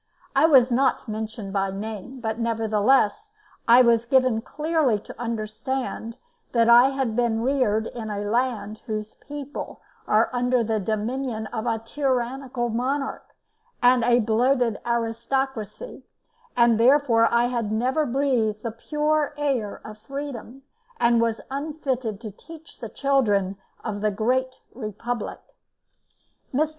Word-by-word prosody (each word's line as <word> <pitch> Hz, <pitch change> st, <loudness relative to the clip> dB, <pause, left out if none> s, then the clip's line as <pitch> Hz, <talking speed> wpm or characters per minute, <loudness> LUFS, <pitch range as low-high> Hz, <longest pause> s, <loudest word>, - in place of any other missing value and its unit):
I 280 Hz, +4 st, +6 dB
was 260 Hz, -5 st, +6 dB
not 260 Hz, +1 st, +1 dB
mentioned 215 Hz, -2 st, -5 dB
by 195 Hz, -1 st, 0 dB
name, 215 Hz, +5 st, -6 dB
but 220 Hz, 0 st, -3 dB
nevertheless 225 Hz, -, +2 dB, 0.4 s
I 245 Hz, +2 st, +8 dB
was 235 Hz, -1 st, +3 dB
given 255 Hz, -3 st, +3 dB
clearly 300 Hz, -3 st, 0 dB
to 205 Hz, -, -11 dB
understand 230 Hz, +1 st, -4 dB, 0.4 s
that 230 Hz, -1 st, +4 dB
I 240 Hz, +3 st, +7 dB
had 265 Hz, -5 st, -2 dB
been 235 Hz, -2 st, +1 dB
reared 245 Hz, -5 st, +1 dB
in 225 Hz, -1 st, -6 dB
a 205 Hz, -1 st, -3 dB
land 220 Hz, -2 st, -1 dB
whose 215 Hz, -1 st, -4 dB
people 290 Hz, 0 st, -8 dB, 0.3 s
are 215 Hz, +2 st, +3 dB
under 245 Hz, 0 st, +2 dB
the 220 Hz, -1 st, 0 dB
dominion 220 Hz, +3 st, -2 dB
of 225 Hz, 0 st, -3 dB
a 225 Hz, -1 st, +1 dB
tyrannical 250 Hz, 0 st, -2 dB
monarch 270 Hz, +4 st, -2 dB, 0.5 s
and 245 Hz, -1 st, +4 dB
a 240 Hz, +1 st, +4 dB
bloated 235 Hz, +1 st, +2 dB
aristocracy; 235 Hz, -, -2 dB, 0.6 s
that 235 Hz, -2 st, +5 dB
therefore 240 Hz, -2 st, +4 dB
I 235 Hz, 0 st, +3 dB
had 235 Hz, -4 st, -2 dB
never 260 Hz, +7 st, +1 dB
breathed 240 Hz, -5 st, 0 dB
the 230 Hz, -, -2 dB
pure 300 Hz, +5 st, -1 dB
air 265 Hz, -8 st, -1 dB
of 215 Hz, 0 st, -9 dB
freedom, 270 Hz, +1 st, -7 dB, 0.4 s
and 235 Hz, -1 st, +4 dB
was 230 Hz, -1 st, 0 dB
unfitted 270 Hz, -7 st, -3 dB
to 220 Hz, -3 st, -6 dB
teach 320 Hz, -, -14 dB
the 230 Hz, -, -6 dB
children 210 Hz, -10 st, +1 dB, 0.3 s
of 205 Hz, -3 st, -4 dB
the 215 Hz, -, +2 dB
Great 255 Hz, +5 st, -1 dB
Republic. 230 Hz, 0 st, -5 dB, 1.1 s
Mr. 300 Hz, +4 st, +1 dB
235 Hz, 130 wpm, -24 LUFS, 220-265 Hz, 1.1 s, I